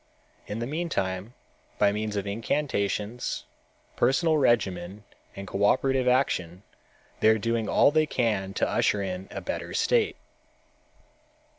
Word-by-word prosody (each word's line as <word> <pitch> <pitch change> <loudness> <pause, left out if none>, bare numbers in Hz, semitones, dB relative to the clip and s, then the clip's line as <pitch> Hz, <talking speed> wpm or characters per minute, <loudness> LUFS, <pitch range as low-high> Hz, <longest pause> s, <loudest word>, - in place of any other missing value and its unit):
In 105 - -4
the 115 - -2
meantime, 120 - -3 0.4
by 100 -1 +4
means 105 0 -3
of 100 -1 -2
incantations, 110 0 -2 0.5
personal 155 +3 +2
regimen 100 -6 0 0.3
and 100 - -7
cooperative 125 +7 +2
action 95 -8 +1 0.6
they 110 - +5
are 110 - +5
doing 115 0 -1
all - - +5
they 155 0 +2
can 105 -8 -1
to - - +1
usher 100 -1 +1
in 95 0 -5
a - - -6
better - - -5
state. 460 -3 +2
110 Hz, 125 wpm, -27 LUFS, 100-130 Hz, 0.6 s, they